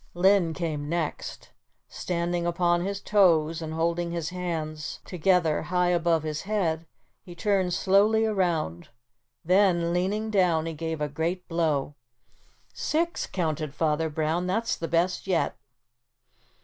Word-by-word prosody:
Linn 180 -2 +3
came 155 -4 -3
next. 170 -2 -4 0.4
Standing 175 0 -2
upon 175 0 +2
his 200 +1 -3
toes 165 -7 +3
and 160 -1 -5
holding 170 +1 0
his 170 -2 -3
hands 160 -4 -4
together 180 -3 +2
high 180 0 +1
above 170 -2 +2
his 155 -1 -3
head 170 -6 -1 0.3
he 175 -2 -12
turned 190 0 +1
slowly 205 +4 +3
around, 170 - -1 0.6
then, 175 -2 +3
leaning 205 +5 -1
down 175 -6 +2
he 165 - -3
gave 160 0 -4
a 150 - +1
great 165 +5 -3
blow. 155 -4 0 0.8
"Six," 335 +2 -1
counted 155 -4 -2
Father 160 +1 +1
Brown, 160 +3 -1
"that's 225 +5 0
the 165 - -4
best 175 +3 0
yet." 180 -3 +1
170 Hz, 130 wpm, -26 LUFS, 160-185 Hz, 0.8 s, Linn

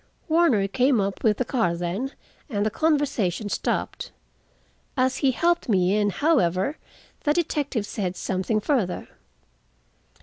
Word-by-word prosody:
Warner 315 - +3
came 255 +3 +2
up 195 0 -2
with 215 -2 +3
the 255 - 0
car 225 -11 0
then, 185 +11 -3 0.4
and 205 -4 -1
the 215 - +1
conversation 270 - 0
stopped. - - -2 0.9
As 260 0 +2
he 275 - +2
helped 340 +3 +1
me 190 -1 +3
in, 205 -1 +2
however, 205 - +1 0.5
the 295 - +3
detective 290 -9 -1
said 185 -4 -3
something 190 +4 -1
further. 215 -6 -1
225 Hz, 130 wpm, -25 LUFS, 195-285 Hz, 0.9 s, Warner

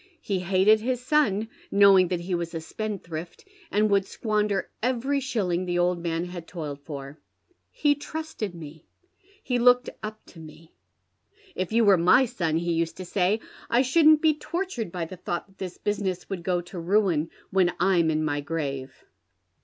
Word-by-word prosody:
He 195 -2 -1
hated 190 +4 +4
his 250 +2 -1
son, 250 -6 +1 0.2
knowing 195 -2 +6
that 175 -1 -2
he 180 +2 -4
was 170 -1 -2
a - - -2
spendthrift, 170 -3 -6 0.2
and 210 +1 +2
would 200 -1 +4
squander 210 -3 -1
every 260 +4 0
shilling 200 -10 -1
the 175 -1 -1
old 175 0 +1
man 170 0 -2
had 175 -2 -8
toiled 150 -5 -6
for. 140 0 -8 0.5
He 290 -1 +2
trusted 290 - -5
me 160 -1 -11 0.3
— 400 +2 -32
he 245 -2 0
looked 245 +1 +4
up 215 0 -7
to 170 - -15
me. 160 +1 -14 0.4
' 400 -2 -30
If 185 - -11
you 230 0 +3
were 200 -2 +6
my 180 +10 +5
son,' 170 -10 -1
he 170 0 -1
used 165 0 -1
to 185 - -6
say, 195 +4 +1
' - - -19
I 240 +2 +4
shouldn't 310 +3 +5
be 315 -1 +5
tortured 320 - -4
by 175 -2 -3
the 185 +3 -9
thought 175 -1 -4
that 195 -1 -26
this 185 -2 -6
business 195 -3 -2
would 190 -3 -3
go 175 0 0
to 175 +1 -9
ruin 170 -3 +1 0.2
when 185 -2 +3
I'm 175 -3 +3
in 155 0 0
my 145 -1 -1
grave.' 140 -3 -4
185 Hz, 185 wpm, -26 LUFS, 170-230 Hz, 0.5 s, knowing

